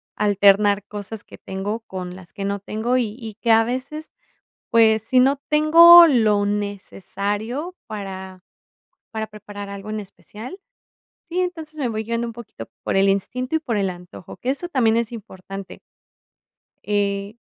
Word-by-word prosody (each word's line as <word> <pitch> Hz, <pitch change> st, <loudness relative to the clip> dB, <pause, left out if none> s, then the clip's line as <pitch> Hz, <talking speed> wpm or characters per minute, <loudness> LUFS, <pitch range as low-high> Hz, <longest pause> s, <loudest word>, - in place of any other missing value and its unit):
alternar 205 Hz, 0 st, +3 dB
cosas 205 Hz, +1 st, -7 dB
que -, -, -14 dB
tengo 205 Hz, +4 st, -4 dB
con 180 Hz, -4 st, -7 dB
las 185 Hz, -2 st, -14 dB
que 195 Hz, -1 st, -5 dB
no 200 Hz, 0 st, -2 dB
tengo 220 Hz, +5 st, -1 dB
y 220 Hz, -3 st, -1 dB
y 220 Hz, -3 st, -8 dB
que 230 Hz, -, +2 dB
a 225 Hz, 0 st, +6 dB
veces, 265 Hz, +6 st, -5 dB, 0.6 s
pues, 220 Hz, -2 st, +4 dB
sí 255 Hz, +2 st, +3 dB
no 270 Hz, +2 st, +4 dB
tengo 335 Hz, +3 st, +9 dB
lo 215 Hz, -7 st, +3 dB
necesario 205 Hz, -, -3 dB
para 190 Hz, -3 st, -7 dB, 0.7 s
para 220 Hz, -1 st, -4 dB
preparar 205 Hz, -1 st, -9 dB
algo 200 Hz, +1 st, -8 dB
en 215 Hz, 0 st, -3 dB
especial, 215 Hz, -, -10 dB, 0.6 s
sí, 350 Hz, +2 st, -4 dB
entonces 320 Hz, -4 st, -5 dB
me 260 Hz, -5 st, -1 dB
voy 220 Hz, 0 st, -3 dB
guiando 235 Hz, +1 st, -2 dB
un 230 Hz, -, -7 dB
poquito 220 Hz, -, -10 dB, 0.2 s
por -, -, -1 dB
el 195 Hz, 0 st, +4 dB
instinto 250 Hz, +9 st, -1 dB
y -, -, +2 dB
por 240 Hz, -8 st, -3 dB
el 195 Hz, -2 st, 0 dB
antojo, 180 Hz, -1 st, -11 dB
que 255 Hz, -, -4 dB
eso 350 Hz, +6 st, -4 dB
también 230 Hz, -7 st, +2 dB
es 235 Hz, 0 st, 0 dB
importante. 195 Hz, -3 st, -9 dB, 1.0 s
Eh, 200 Hz, +1 st, -1 dB
215 Hz, 160 wpm, -22 LUFS, 200-250 Hz, 1.0 s, tengo